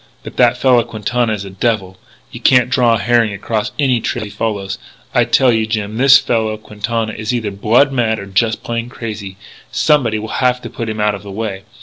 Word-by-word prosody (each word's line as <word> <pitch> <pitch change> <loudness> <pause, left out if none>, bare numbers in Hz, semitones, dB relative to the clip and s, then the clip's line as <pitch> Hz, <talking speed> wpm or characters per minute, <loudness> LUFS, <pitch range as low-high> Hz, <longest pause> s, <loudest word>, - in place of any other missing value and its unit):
But - - -9
that 125 0 +4
fellow 125 -2 +4
Quintana 115 +1 -1
is 100 -2 -4
a 95 - -8
devil. 95 -2 -1 0.4
You - - -8
can't 125 -1 +4
draw 120 -3 +3
a - - 0
herring 115 -2 +2
across 105 +2 -2
any 130 -5 +2
trail 120 0 -2
he 105 - -9
follows. 100 -4 -3 0.3
I - - +3
tell 130 -2 +3
you, 110 -1 0
Jim, 110 -1 -3
this 135 +2 +7
fellow 110 -5 -1
Quintana 110 +1 -3
is 110 +1 -3
either 110 -4 -2
blood 115 +8 +3
mad 115 -4 +1
or 100 - -7
just 110 +3 0
plain 115 0 -3
crazy. 105 -5 -7 0.3
Somebody 130 -8 +2
will 110 +1 -6
have 125 -1 +2
to - - -7
put 115 -1 -4
him 110 0 -4
out 105 0 +2
of 100 - -6
the 100 - -11
way. 100 -1 -5
110 Hz, 215 wpm, -16 LUFS, 105-120 Hz, 0.4 s, this